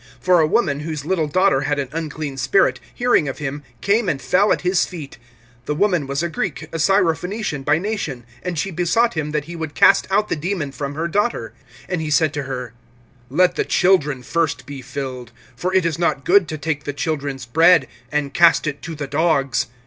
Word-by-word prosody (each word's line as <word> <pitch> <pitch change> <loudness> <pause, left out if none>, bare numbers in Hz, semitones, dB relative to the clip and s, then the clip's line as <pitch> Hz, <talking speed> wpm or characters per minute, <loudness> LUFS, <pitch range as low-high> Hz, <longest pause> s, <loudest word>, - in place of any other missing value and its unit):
(25)For 180 -2 +5
a - - +2
woman, 145 -6 +1
whose 150 -2 -5
little 165 -3 0
daughter 185 -2 +2
had 145 +1 -1
an 140 -2 -2
unclean 155 -3 -4
spirit, 130 0 +2
hearing 245 - +2
of 135 - -6
him, 145 0 -4 0.2
came 205 0 +2
and 140 - -1
fell 180 +11 +2
at - - +1
his 180 0 +2
feet. 150 -8 -8 0.5
(26)The 150 - -1
woman 180 -7 +1
was 140 +3 -2
a - - +1
Greek, 165 -1 -3
a 165 - -4
Syrophenician 180 -1 +1
by 155 - +3
nation; 170 - -3 0.2
and 180 -2 -4
she 195 +6 -1
besought 180 +8 +1
him 155 -2 -2
that 150 -1 -2
he 170 +2 -8
would 160 -3 -5
cast 195 - +5
out 210 +2 +2
the - - -1
demon 160 -2 -3
from 140 +1 -5
her 165 +2 -1
daughter. 170 - -1 0.3
(27)And 180 -3 -2
he 155 - -3
said 155 0 +2
to 145 - -3
her: 125 -3 -5 0.6
Let 180 +7 +3
the - - +2
children 150 -8 +2
first 155 -6 -1
be 140 -1 -8
filled; 130 -2 -6 0.2
for 185 - -2
it 190 -2 +2
is 165 -1 -1
not 170 -5 0
good 190 -1 +5
to 155 - -4
take 150 0 -3
the 145 - -3
children's 140 -3 -3
bread 160 +3 +5 0.2
and 145 -2 -1
cast 170 -1 +5
it 150 -2 -3
to 165 - -6
the 145 -1 -4
dogs. 140 -4 +1
155 Hz, 210 wpm, -20 LUFS, 140-180 Hz, 0.6 s, 25)For